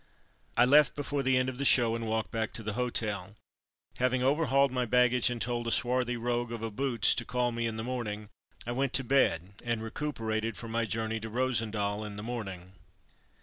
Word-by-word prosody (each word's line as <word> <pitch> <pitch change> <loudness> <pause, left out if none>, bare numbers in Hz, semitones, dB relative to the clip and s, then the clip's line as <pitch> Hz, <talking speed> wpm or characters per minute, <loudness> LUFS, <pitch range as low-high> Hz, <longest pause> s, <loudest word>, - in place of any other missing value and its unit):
'' - - -35
I 120 - +6
left 145 0 +5
before 145 -1 -2
the 130 -1 +2
end 130 0 +1
of 130 0 -5
the - - -1
show, 120 -4 +5
and 115 -1 -4
walked 110 0 -2
back 110 -1 -2
to 110 - -5
the 105 0 -3
hotel. 105 -5 -2 0.6
Having 125 0 +1
over 145 +4 +2
hauled 135 +1 +3
my 125 -1 0
baggage 125 +1 +4
and 120 -1 -4
told 120 0 -2
a - - 0
swarthy 125 0 +1
rogue 120 0 -2
of 115 -1 -5
a 115 - -3
Boots 120 0 +2
to 115 - -1
call 125 0 -1
me 115 0 -2
in 110 -1 -4
the 110 - -4
morning, 110 -4 -4 0.4
I 120 - -3
went 135 +1 -1
to 135 - +4
bed, 100 -9 +1
and 120 -2 -2
recuperated 115 -3 -3
for 115 - -7
my 115 +1 -1
journey 110 0 -2
to 110 0 -7
Rosendael 110 -4 -1
in 105 -1 -7
the 105 - -7
morning. 95 -6 -6
120 Hz, 215 wpm, -30 LUFS, 110-125 Hz, 0.6 s, I